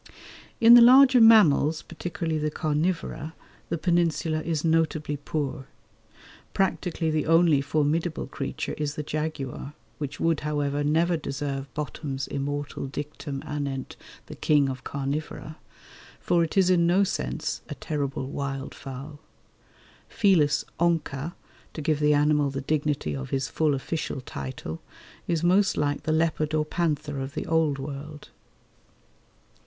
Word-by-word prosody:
In 230 +1 +8
the 240 - +10
larger 255 +1 +8
mammals, 165 -9 +6
particularly 165 -1 -4
the 150 0 0
carnivora, 155 +1 -2 0.3
the 170 - -1
Peninsula 165 -2 +1
is 160 -1 -2
notably 160 -2 +1
poor. 145 -1 -4 0.9
Practically 180 -4 0
the 155 -1 0
only 165 -3 +5
formidable 155 +3 0
creature - - -4
is 145 -1 -2
the 150 - -3
jaguar, 150 -2 -4 0.2
which 145 -1 -5
would, 165 -2 +1
however, 145 -1 -1
never 165 +4 +2
deserve 140 -2 -4
Bottom's 145 -2 -4
immortal 145 0 -4
dictum 145 0 -6
anent 140 -3 -4 0.3
the - - -9
king 145 -3 +2
of 130 -1 -6
carnivora, 145 +2 -4 0.6
for 170 -1 +2
it 165 - -3
is 185 -1 +5
in 170 -2 +4
no 185 +3 +4
sense 65 - -3
"a - - -5
terrible 140 -3 -3
wild 140 0 -4
fowl." 135 +3 -9 0.9
Felis 180 -9 +3
onca, 165 -2 0 0.4
to - - -7
give 155 0 +1
the 150 0 +4
animal 150 -1 +3
the 135 0 -4
dignity 145 - -1
of 65 -1 -6
his 135 -1 -1
full 155 -3 +1
official 145 +1 -3
title, 130 -10 -7 0.5
is 170 -1 0
most 190 +3 +3
like 145 -1 0
the 155 - -2
leopard 155 -1 +1
or 155 -1 +1
panther 150 -3 -2
of 135 +3 -5
the - - -3
Old 160 -3 +1
World. 145 +2 -8
150 Hz, 135 wpm, -26 LUFS, 140-165 Hz, 0.9 s, the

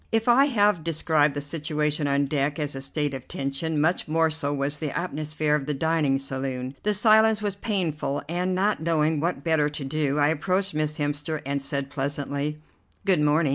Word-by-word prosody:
If 225 +1 +1
I 250 +3 +6
have 205 - +2
described 155 -2 +2
the 145 - -2
situation 150 0 -2
on 140 0 +2
deck 145 0 -1
as 150 -2 -2
a 135 - -6
state 145 +1 -2
of 130 -1 -7
tension, 140 +3 -2
much 160 +4 +1
more 160 +1 +2
so 145 -2 0
was 145 +1 +3
the 150 -2 -3
atmosphere 155 -2 -2
of 150 -2 0
the 150 - -1
dining 155 -2 +1
saloon. 135 -1 -4
The 210 0 +1
silence 220 +1 +5
was 205 -1 -1
painful, 175 -9 -2
and, 180 +3 -1
not 200 +1 +1
knowing 160 -1 +1
what 170 +4 -2
better 160 -3 +2
to 150 -1 -6
do, 145 0 -1
I 145 0 +3
approached 185 +5 0
Miss 155 0 -1
Hemster 145 +1 -2
and 140 0 -1
said 140 0 -3
pleasantly: 145 +1 -3 0.5
"Good 185 -6 +3
morning. 150 +1 +3
150 Hz, 190 wpm, -25 LUFS, 145-165 Hz, 0.5 s, I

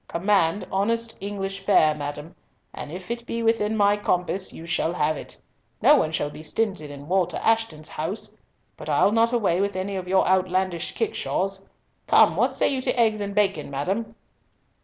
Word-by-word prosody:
Command 190 0 +1
honest 230 +4 -1
English 195 -1 -4
fare, 195 -6 +4
madam, 150 +2 -6 0.4
and 145 - -6
if 185 +5 -7
it 235 0 -4
be 230 0 -3
within 220 -1 +1
my 205 0 +4
compass, 185 -1 -1
you 165 - -10
shall 170 0 0
have 155 -1 +1
it. - - -9 0.4
No - - +6
one 155 - +1
shall 145 -1 -1
be 150 - -10
stinted 160 -1 -2
in 145 0 -10
Walter 180 -1 +1
Ashton's 225 -9 0
house; 165 +8 -5 0.4
but - - -8
I'll - - +4
not 230 +1 +3
away 200 -7 +1
with 200 -1 -1
any 190 +1 -3
of 185 -1 -4
your 190 +1 +3
outlandish 185 -1 0
kickshaws. 195 - -2 0.4
Come, - - +5
what - - +1
say - - +2
you 265 -2 0
to 250 - -1
eggs 220 -2 +3
and 200 0 -4
bacon, 195 -8 +1
madam?" 195 +11 -3
195 Hz, 180 wpm, -24 LUFS, 165-210 Hz, 0.4 s, No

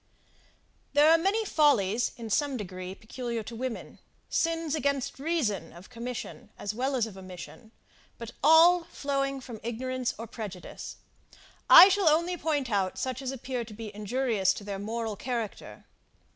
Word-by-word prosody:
There 295 +2 +6
are 330 - +7
many 405 +6 +1
follies, 245 - +2
in 230 -2 -7
some 285 +2 +1
degree, 185 -2 -6
peculiar 235 +1 -5
to 230 - -8
women: 250 0 -5 0.3
sins 330 -2 0
against 280 -4 -1
reason, 270 - -1
of 175 +7 -14
commission, 245 0 -7
as 205 - -4
well 265 +4 -1
as 240 -3 +1
of 200 -4 -10
omission; 185 +4 -11 0.5
but 235 -1 -8
all 330 +3 +7
flowing 275 -3 -2
from 235 -4 -9
ignorance 255 +2 -3
or 230 - -6
prejudice, 210 -5 -8 0.7
I 370 - +12
shall 390 -4 +3
only 340 +4 +2
point 295 -6 -1
out 195 -2 0
such 260 0 -3
as 265 - -4
appear 255 -1 -4
to 220 -2 -11
be 215 -1 -8
injurious 210 -2 0
to - - -8
their 200 -1 -5
moral 220 +1 -3
character. 235 -1 -5
245 Hz, 155 wpm, -28 LUFS, 215-285 Hz, 0.7 s, I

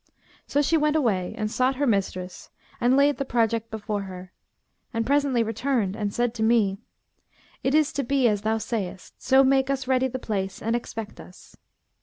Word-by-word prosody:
So 290 - +1
she 325 +3 +3
went 300 0 +1
away 215 - 0
and 215 -2 -2
sought 255 +2 +1
her 285 +2 0
mistress 190 -5 -2 0.3
and 250 +2 +3
laid 285 +1 +4
the 275 - -1
project 230 -3 0
before 210 -1 -3
her, 185 -1 -9 0.6
and 230 0 -1
presently 275 -3 +2
returned 225 -2 -1
and 205 -2 -2
said 240 +1 0
to 230 - -6
me, 220 -4 +2 0.8
'It 270 +2 +2
is 310 0 +3
to 280 - -1
be 270 0 +2
as 205 -3 +1
thou 220 +1 0
sayest: 205 -5 -5
so 265 +1 +5
make 265 0 +3
us 270 -2 -2
ready 260 0 +2
the 260 - -4
place 195 -6 -3
and 225 +2 -1
expect 225 -2 -6
us.' 180 - -14
235 Hz, 185 wpm, -25 LUFS, 210-270 Hz, 0.8 s, so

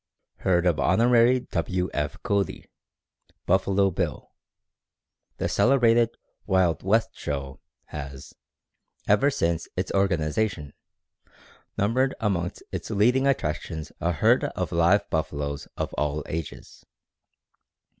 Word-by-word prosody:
Herd 90 -2 +1
of 85 -4 +2
Hon. 70 - +2 0.5
W. 90 -1 -1
F. 75 0 -2
Cody 100 -3 -1 0.8
("Buffalo 95 +1 +2
Bill"). - - -3 1.1
The - - -1
celebrated 120 -3 +3 0.3
"Wild 90 -4 +2
West 110 +4 +2
Show" 70 -2 -5 0.3
has, 70 -2 -8 0.7
ever 105 +8 +4
since 85 - -1
its 90 +1 -2
organization, 85 -3 0 1.0
numbered 130 +6 +1
amongst 90 -5 -2
its - - -5
leading 125 +7 +3
attractions 80 - -2
a 85 +1 +1
herd 75 - +3
of - - -3
live 85 +5 +3
buffaloes 70 -2 -2
of - - -3
all 75 0 -1
ages. 80 -1 -7
90 Hz, 105 wpm, -25 LUFS, 75-105 Hz, 1.1 s, ever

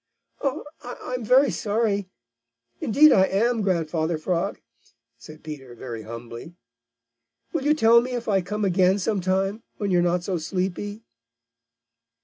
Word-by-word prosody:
"I 275 +2 -1 0.2
I'm 245 0 -6
very 260 +5 +4
sorry. 205 -3 -1 0.7
Indeed 295 +7 +5
I 190 - +5
am, 225 +4 +1
Grandfather 165 -3 0
Frog," 170 +2 -2 0.6
said 155 +5 -13
Peter 135 -6 -8
very 115 -1 -7
humbly. 115 +7 -9 1.0
"Will 305 -5 -2
you 300 +1 +4
tell 235 -4 +6
me 250 +1 -5
if 240 -1 -4
I 195 -3 +2
come 210 +4 -3
again 185 0 +3
some 205 0 -1
time 195 +4 0 0.2
when 205 -2 -2
you 180 - +4
are - - +4
not 175 0 +1
so 180 -2 -2
sleepy?" 190 +5 -3
195 Hz, 140 wpm, -24 LUFS, 170-225 Hz, 1.0 s, tell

